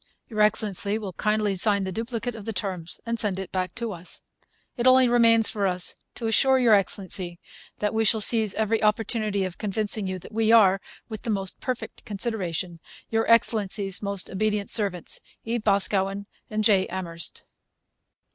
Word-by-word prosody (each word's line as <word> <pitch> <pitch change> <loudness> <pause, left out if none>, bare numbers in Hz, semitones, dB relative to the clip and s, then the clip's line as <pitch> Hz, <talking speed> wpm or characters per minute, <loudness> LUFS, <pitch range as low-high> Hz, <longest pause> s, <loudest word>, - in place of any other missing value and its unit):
Your 215 -2 -1
Excellency 210 -1 +1
will 200 -4 -6
kindly 210 +1 0
sign 200 +1 +1
the 190 - -3
duplicate 230 +3 -3
of 220 -3 -9
the 225 - -3
terms 185 -4 -4
and 230 0 -2
send 205 -4 -1
it 190 -1 -6
back 185 -1 -2
to 230 -1 -3
us. 175 0 -12 0.5
It 240 0 +1
only 255 0 +7
remains 230 -2 +5
for 205 -3 0
us 180 -1 -3 0.2
to 235 - -5
assure 265 +4 +4
Your 240 -4 +5
Excellency 185 -3 -1 0.4
that 210 0 -1
we 220 0 +2
shall 220 +1 +4
seize 215 -1 +1
every 220 0 +1
opportunity 215 -1 +1
of 185 -2 -5
convincing 210 0 -1
you 185 0 -3
that 185 - -11
we 225 0 +2
are, 195 -4 +6 0.3
with 220 -3 -7
the - - -5
most 195 -3 -1
perfect 255 -2 -4
consideration, 190 -6 -3 0.3
Your 225 0 +1
Excellency's 205 -4 +2
most 200 -2 -2
Obedient 210 +1 -1
Servants, 195 -6 -1 0.3
E. 235 +1 -1
BOSCAWEN. 200 -1 +1 0.4
J. 200 -3 +4
AMHERST. 170 -3 -5
210 Hz, 165 wpm, -25 LUFS, 190-225 Hz, 0.5 s, only